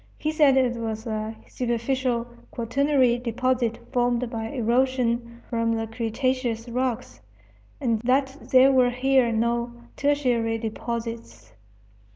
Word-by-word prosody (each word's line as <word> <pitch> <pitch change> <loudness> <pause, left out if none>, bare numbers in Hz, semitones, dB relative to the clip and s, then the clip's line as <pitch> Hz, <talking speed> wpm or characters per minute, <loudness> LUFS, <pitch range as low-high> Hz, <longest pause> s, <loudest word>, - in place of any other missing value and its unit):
He 310 - -1
said 295 -4 +4
it 250 -2 +2
was 220 -1 -4
a 220 -1 -3
superficial 240 0 -1 0.2
quaternary 255 0 +1
deposit 245 0 0
formed 245 -1 0
by 225 -1 -3
erosion 240 -1 0
from 230 -1 0
the 225 0 -2
cretaceous 230 +1 -2
rocks, 250 - -3 0.6
and 230 -4 0
that 265 +2 +1
there 260 0 +6
were 255 -2 +4
here 255 -1 +2
no 235 +1 0 0.2
tertiary 250 -6 +1
deposits. 225 - -6
240 Hz, 115 wpm, -25 LUFS, 230-255 Hz, 0.6 s, there